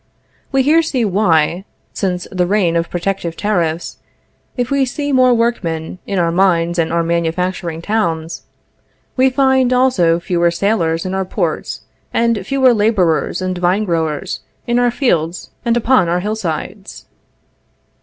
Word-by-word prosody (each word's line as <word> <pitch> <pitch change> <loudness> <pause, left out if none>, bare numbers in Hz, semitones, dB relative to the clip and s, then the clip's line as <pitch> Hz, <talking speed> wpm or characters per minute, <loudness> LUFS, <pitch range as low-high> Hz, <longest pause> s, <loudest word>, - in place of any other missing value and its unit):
We 270 -1 +2
here 310 +4 +4
see 265 -7 -1
why, 180 -3 +2 0.3
since 180 -2 -2
the 180 -2 0
reign 185 -4 +1
of 170 0 0
protective 175 -2 -3
tariffs, 175 -6 -1 0.6
if 245 0 -2
we 280 -1 +2
see 285 +3 -3
more 255 -1 +4
workmen 185 -9 -1
in 200 - -2
our 170 -2 +2
mines 170 -1 +2
and 160 -1 0
our 170 0 +1
manufacturing 170 0 -2
towns, 170 -7 -1 0.7
we 260 0 +4
find 265 -1 +2
also 250 -10 +3
fewer 170 0 +1
sailors 170 -3 0
in 185 - -3
our 190 0 0
ports, 185 - -3 0.3
and 230 -3 +1
fewer 265 -2 +4
laborers 205 -6 +1
and 185 -1 -2
vine 180 +4 +1
growers 160 -6 -2 0.3
in 240 0 +1
our 245 0 +3
fields 175 - -1
and 235 -1 +1
upon 240 -6 +3
our 175 +1 0
hillsides. 195 -1 -5
185 Hz, 145 wpm, -17 LUFS, 170-235 Hz, 0.7 s, here